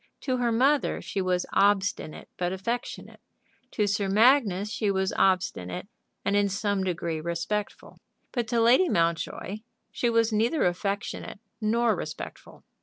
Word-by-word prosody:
To 255 -2 -1
her 240 -1 +1
mother 270 +5 +2
she 195 - -3
was 180 -1 0
obstinate 200 -5 +1
but 175 0 -1
affectionate 220 +2 -4 0.5
To 210 - +1
Sir 200 -1 0
Magnus 210 -2 +4
she 215 -3 -1
was 190 -1 0
obstinate 180 - 0 0.4
and 200 - +1
in 205 0 +3
some 200 0 -1
degree 170 -3 -2
respectful. 170 +5 -4 0.3
But 240 -3 -2
to 235 +1 +1
Lady 250 +11 +5
Mountjoy 170 - -1 0.3
she 240 - 0
was 230 -1 +2
neither 235 +8 +2
affectionate 195 +3 -3 0.2
nor 225 +1 +2
respectful. - - -8
205 Hz, 135 wpm, -27 LUFS, 190-230 Hz, 0.5 s, Lady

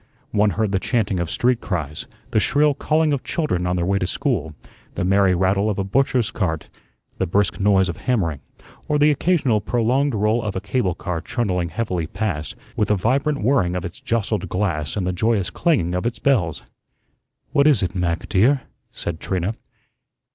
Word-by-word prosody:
One 105 0 +3
heard 110 -2 +1
the 95 - +1
chanting 105 -4 0
of 85 -2 -2
street 125 +4 +1
cries, 75 -6 -4 0.2
the - - +3
shrill 145 +6 +3
calling 155 +1 +1
of 140 - -2
children 90 - -1
on 90 - 0
their 85 -1 0
way 100 +2 +1
to 90 - -1
school, 90 - -2 0.4
the 90 - -1
merry 95 -1 +4
rattle 95 +3 +2
of 105 - -2
a 100 - 0
butcher's 125 +2 +1
cart, 80 -7 -2 0.5
the 95 - +1
brisk 100 +4 +1
noise 95 -2 +4
of 85 - -4
hammering, 95 - 0 0.5
or 150 - +2
the 150 +1 +5
occasional 140 - +2
prolonged 120 +5 +1
roll 105 +3 +2
of 105 -2 -4
a - - 0
cable 100 -3 -1
car 85 -2 -4
trundling 90 -8 -1
heavily 90 -7 -2
past, 80 -5 -3 0.2
with 105 - 0
a 105 - +4
vibrant 135 +6 0
whirring 105 -8 +2
of 90 0 -3
its 90 - -7
jostled 110 -4 -1
glass 85 -5 -1
and 95 - -1
the 90 - -1
joyous 105 0 0
clanging 130 - +1
of 90 +5 -1
its 120 - -3
bells. 105 - +1 0.9
"What 140 +1 +4
is 145 -9 +4
it, 90 - -1
Mac, 85 -2 -1
dear?" 125 +8 +3 0.3
said 80 -2 -5
Trina. 95 +3 -2
100 Hz, 185 wpm, -22 LUFS, 90-120 Hz, 0.9 s, the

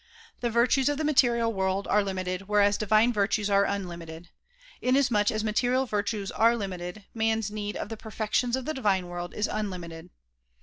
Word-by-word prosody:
The 240 - -1
virtues 245 +4 +3
of 290 - -1
the 310 - -2
material 235 -6 +3
world 190 0 -1
are 210 0 +3
limited 185 -1 -4
whereas 205 -1 +3
divine 215 +3 +3
virtues 205 0 0
are 200 0 +4
unlimited. 170 -4 -5 0.5
Inasmuch 245 -5 +2
as 215 0 -1
material 245 +4 +1
virtues 205 -2 -2
are 230 +2 +3
limited, 190 -1 -5
man's 220 -2 0
need 210 -1 -4
of - - -5
the 225 - -6
perfections 220 +3 -1
of 260 -1 -5
the 310 - -2
divine 195 -9 0
world 175 0 -6
is 210 - 0
unlimited. 175 -6 -5
210 Hz, 170 wpm, -27 LUFS, 195-235 Hz, 0.5 s, are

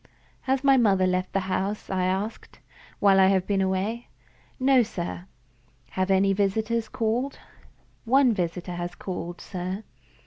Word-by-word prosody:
"Has 265 0 +1
my 275 -1 +5
mother 195 -6 +3
left 185 0 0
the 195 - 0
house," 190 +2 -2
I 185 -1 0
asked, 195 +4 -3 0.4
"while 195 -1 +4
I 190 - +6
have 190 -1 +2
been 200 -2 +1
away?" 190 +5 -1 0.5
"No, 260 0 +5
sir." 180 -4 -5 0.6
"Have 185 0 -1
any 195 +1 +3
visitors 220 +3 0
called?" 235 +5 -1 0.7
"One 260 0 +4
visitor 180 -1 -3
has 175 0 -5
called, 175 -2 -6
sir." 185 +3 -5
195 Hz, 140 wpm, -26 LUFS, 185-225 Hz, 0.7 s, I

